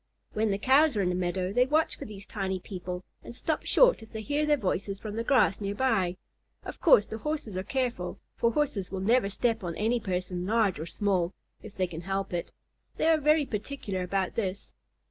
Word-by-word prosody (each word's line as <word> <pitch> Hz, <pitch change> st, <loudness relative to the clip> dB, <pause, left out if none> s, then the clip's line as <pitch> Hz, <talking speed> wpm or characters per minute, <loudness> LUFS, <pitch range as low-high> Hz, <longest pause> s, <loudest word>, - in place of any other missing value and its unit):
When 215 Hz, 0 st, +1 dB
the 195 Hz, -, +1 dB
Cows 270 Hz, +4 st, +4 dB
are 200 Hz, -, +2 dB
in 180 Hz, -, +1 dB
the -, -, 0 dB
meadow, 180 Hz, +1 st, -1 dB
they 250 Hz, +2 st, +4 dB
watch 310 Hz, +3 st, +2 dB
for -, -, -8 dB
these 200 Hz, -2 st, -9 dB
tiny 190 Hz, -3 st, -3 dB
people, 180 Hz, -1 st, -6 dB, 0.2 s
and 235 Hz, -, -9 dB
stop 315 Hz, +5 st, -2 dB
short -, -, +5 dB
if 220 Hz, -, -12 dB
they 220 Hz, -1 st, -6 dB
hear 295 Hz, +4 st, 0 dB
their 295 Hz, -1 st, +4 dB
voices 200 Hz, -3 st, -2 dB
from 215 Hz, -1 st, -6 dB
the 230 Hz, -, -1 dB
grass 240 Hz, -6 st, +3 dB
near 200 Hz, 0 st, -2 dB
by. 200 Hz, -8 st, +1 dB, 0.5 s
Of -, -, -8 dB
course 245 Hz, -, +6 dB
the 220 Hz, -, -6 dB
Horses 295 Hz, -7 st, -3 dB
are 185 Hz, -, -1 dB
careful, 240 Hz, -4 st, -2 dB, 0.2 s
for 235 Hz, -, +2 dB
Horses 225 Hz, -9 st, -1 dB
will 190 Hz, -, -3 dB
never 220 Hz, +2 st, +3 dB
step 225 Hz, +1 st, 0 dB
on 170 Hz, -2 st, -3 dB
any 230 Hz, +3 st, +1 dB
person, 180 Hz, -2 st, -3 dB
large 215 Hz, -6 st, +2 dB
or 160 Hz, -, -5 dB
small, 185 Hz, -2 st, 0 dB, 0.3 s
if 210 Hz, -2 st, -11 dB
they 185 Hz, -, +1 dB
can 170 Hz, -2 st, -7 dB
help 195 Hz, +1 st, -3 dB
it. 175 Hz, -, -3 dB, 0.5 s
They -, -, 0 dB
are 320 Hz, -1 st, +5 dB
very 300 Hz, 0 st, +4 dB
particular 210 Hz, -4 st, -4 dB
about 185 Hz, +1 st, -1 dB
this. 195 Hz, -3 st, -3 dB
205 Hz, 215 wpm, -28 LUFS, 185-245 Hz, 0.5 s, course